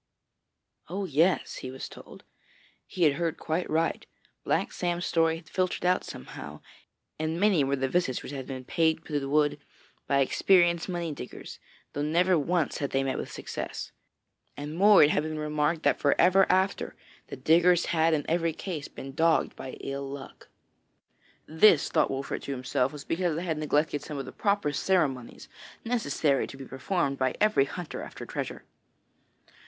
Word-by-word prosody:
'Oh! 195 +3 -3
yes,' 170 +2 +1
he 130 - -6
was 130 +1 -6
told, - - -13 0.6
'he 180 - -2
had 150 -3 +5
heard 165 -1 -1
quite 165 +3 -2
right. 165 +1 0 0.4
Black - - 0
Sam's 175 0 -2
story 165 -1 +2
had 165 0 -11
filtered 185 +1 -1
out 180 +1 +3
somehow, 65 - -9 0.6
and 160 +2 -2
many 195 -7 +4
were 135 +1 +1
the 135 0 -1
visits 135 -4 0
which - - -7
had 135 -2 -6
been 130 -2 -6
paid 160 0 +1
to 150 -2 -1
the 135 -1 -5
wood 145 0 +2 0.5
by 140 0 +3
experienced 175 +4 +3
money 170 -2 -2
diggers, 145 - -9 0.3
though 145 - -3
never 175 +5 +3
once 165 0 0
had 140 - -1
they 135 0 0
met 135 -1 -2
with - - -6
success. - - -6 0.7
And 150 +2 -5
more, 205 +3 +7
it 150 - +5
had - - +2
been 155 0 -4
remarked 150 +1 0
that - - +2
for 145 - +2
ever 190 +1 +5
after, 190 +1 0 0.3
the - - -7
diggers 170 +6 +4
had 160 0 +3
in 145 - -2
every 165 0 +1
case 160 -3 -5
been 135 0 -9
dogged 160 +2 +2
by 130 - -7
ill 140 0 -4
luck.' 140 -1 -9 1.0
(This, 160 0 +5
thought - - +2
Wolfert 135 +1 -3
to - - -4
himself, 130 0 0
was 150 -2 -9
because 170 -1 0
they 165 - -3
had 160 -4 -2
neglected 150 -1 +1
some 150 -1 -6
of 135 - -4
the - - -8
proper 200 -7 0
ceremonies 145 -10 0 0.4
necessary 155 - +1
to 135 - -10
be 135 - -8
performed 140 +1 -2
by 130 -1 +1
every 210 -10 +4
hunter 175 +3 -6
after - - -8
treasure.) - - -5
155 Hz, 175 wpm, -28 LUFS, 140-175 Hz, 1.0 s, more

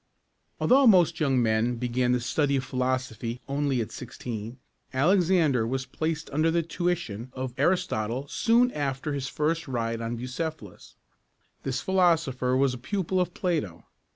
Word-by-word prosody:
Although 265 +1 +5
most 175 -5 +5
young 135 -5 +2
men 110 +2 +1
began 125 +1 0
the 125 - +2
study 140 +4 0
of 130 - 0
philosophy 125 -2 -2
only 140 -2 0
at 110 - -5
sixteen, 115 -1 -7 0.3
Alexander 160 - +3
was 130 +2 -2
placed 160 +1 -3
under 155 +3 +2
the 170 +1 +1
tuition 165 - -2
of 130 -1 -4
Ar´is 175 +7 +2
totle 115 +6 -3
soon 235 - +3
after 145 - -2
his 135 -2 -3
first 155 +3 -1
ride 115 -3 -2
on 115 +1 -3
Bucephalus. 125 - -6 0.7
This 130 -1 -2
philosopher 165 -9 +2
was 135 -1 +2
a 125 - -7
pupil 185 +5 -1
of 180 -1 -3
Plato. 150 - -2
135 Hz, 150 wpm, -27 LUFS, 125-165 Hz, 0.7 s, Although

